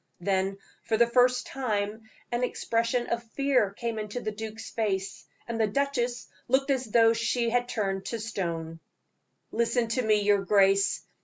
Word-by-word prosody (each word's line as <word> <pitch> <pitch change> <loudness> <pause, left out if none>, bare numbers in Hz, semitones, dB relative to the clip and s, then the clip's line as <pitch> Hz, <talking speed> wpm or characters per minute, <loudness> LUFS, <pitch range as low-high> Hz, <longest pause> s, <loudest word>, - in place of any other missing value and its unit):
Then, 195 +1 0 0.2
for 220 - 0
the 235 - +6
first 250 +1 +3
time, 220 -4 -3 0.2
an 240 +1 0
expression 235 0 0
of 235 0 -2
fear 270 -7 +2
came 225 +2 -4
into 210 +3 -4
the 215 -3 -3
duke's 220 +1 -7
face, 195 -4 -2 0.2
and 230 -1 -2
the 220 - +3
duchess 245 0 -1 0.2
looked 270 +2 +2
as 260 -1 0
though 225 0 +5
she 230 +1 0
were 245 +1 +3
turned 195 -6 -3
to 230 +3 -3
stone. 170 -7 -4 0.7
"Listen 235 0 +1
to 255 +3 +1
me, 215 -3 +3
your 205 -1 +3
grace. 195 0 +3
225 Hz, 160 wpm, -28 LUFS, 205-245 Hz, 0.7 s, the